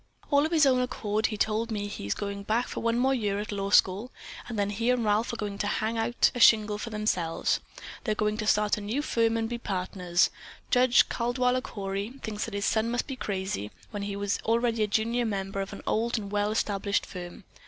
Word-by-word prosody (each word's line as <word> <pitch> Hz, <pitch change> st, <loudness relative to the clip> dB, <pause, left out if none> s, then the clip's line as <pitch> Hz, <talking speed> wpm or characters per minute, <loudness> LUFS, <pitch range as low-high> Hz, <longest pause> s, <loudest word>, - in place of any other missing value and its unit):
"All 285 Hz, +1 st, +4 dB
of -, -, -11 dB
his 315 Hz, -3 st, +5 dB
own 255 Hz, -2 st, +4 dB
accord 215 Hz, -3 st, -1 dB
he 215 Hz, -, -4 dB
told 220 Hz, +2 st, 0 dB
me 210 Hz, -2 st, -2 dB
that 205 Hz, 0 st, -5 dB
he's 100 Hz, -, -3 dB
going 200 Hz, 0 st, -4 dB
back 220 Hz, +4 st, 0 dB
for -, -, -5 dB
one 230 Hz, 0 st, +1 dB
more 260 Hz, +2 st, +3 dB
year 205 Hz, -6 st, 0 dB
at 210 Hz, +1 st, -4 dB
law 200 Hz, -1 st, -2 dB
school 200 Hz, +5 st, +3 dB, 0.4 s
and 230 Hz, -, -4 dB
then 205 Hz, 0 st, 0 dB
he 230 Hz, +4 st, -1 dB
and 250 Hz, -2 st, +2 dB
Ralph 210 Hz, +2 st, +2 dB
are -, -, -4 dB
going 205 Hz, -3 st, -4 dB
to 205 Hz, -, 0 dB
hang 220 Hz, +2 st, -1 dB
out 230 Hz, +2 st, +2 dB
a 245 Hz, -, -4 dB
shingle 215 Hz, -3 st, +5 dB
for 230 Hz, -, -5 dB
themselves. 210 Hz, -6 st, 0 dB, 0.4 s
They're 215 Hz, -3 st, 0 dB
going 210 Hz, 0 st, 0 dB
to 215 Hz, -1 st, -3 dB
start 210 Hz, 0 st, +3 dB
a -, -, -7 dB
new 225 Hz, +8 st, -2 dB
firm 230 Hz, -4 st, +1 dB
and 225 Hz, 0 st, -1 dB
be 240 Hz, +1 st, -4 dB
partners. 180 Hz, -3 st, 0 dB, 0.4 s
Judge 250 Hz, -1 st, +5 dB
Caldwaller 250 Hz, +1 st, +1 dB
Cory 200 Hz, 0 st, -4 dB
thinks 210 Hz, -1 st, -3 dB
that 225 Hz, -, -6 dB
his 200 Hz, +1 st, -1 dB
son 220 Hz, +1 st, +1 dB
must 240 Hz, +1 st, -1 dB
be 270 Hz, -, -5 dB
crazy, 190 Hz, -, -3 dB, 0.2 s
when 205 Hz, -2 st, -4 dB
he 200 Hz, 0 st, -3 dB
is 200 Hz, 0 st, -1 dB
already 230 Hz, 0 st, +1 dB
a 210 Hz, -, +3 dB
junior 230 Hz, +3 st, +1 dB
member 195 Hz, -3 st, -2 dB
of 195 Hz, -, -5 dB
an -, -, -9 dB
old 235 Hz, +2 st, 0 dB
and 200 Hz, -2 st, -5 dB
well 205 Hz, 0 st, +1 dB
established 205 Hz, -2 st, 0 dB
firm. 180 Hz, +1 st, -8 dB
215 Hz, 225 wpm, -28 LUFS, 200-235 Hz, 0.4 s, his